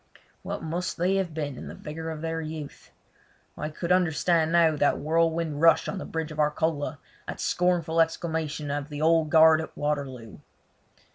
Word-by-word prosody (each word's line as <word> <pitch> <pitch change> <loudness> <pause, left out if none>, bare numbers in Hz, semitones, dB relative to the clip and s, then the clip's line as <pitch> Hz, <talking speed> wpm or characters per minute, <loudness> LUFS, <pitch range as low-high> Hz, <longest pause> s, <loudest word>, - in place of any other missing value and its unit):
What - - -5
must 170 +3 -3
they 185 +3 +1
have 190 -3 -1
been 145 -4 -4
in - - -8
the - - -8
vigour 160 +2 -6
of 155 -1 -6
their 165 0 -2
youth. 155 -2 -8 0.7
I 155 - -4
could 170 +3 -4
understand 170 -2 +2
now 165 -2 +4
that 145 -1 +2
whirlwind 160 0 0
rush 165 0 +5
on 195 - -3
the - - -6
bridge 160 -1 -4
of 155 - -8
Arcola, 150 0 0 0.3
that - - -6
scornful 175 -2 +1
exclamation 160 -3 -2
of 145 +1 -3
the 150 0 -4
Old 160 -1 +3
Guard 160 0 +6
at 160 - -9
Waterloo! 135 -7 -3
160 Hz, 170 wpm, -26 LUFS, 150-165 Hz, 0.7 s, Guard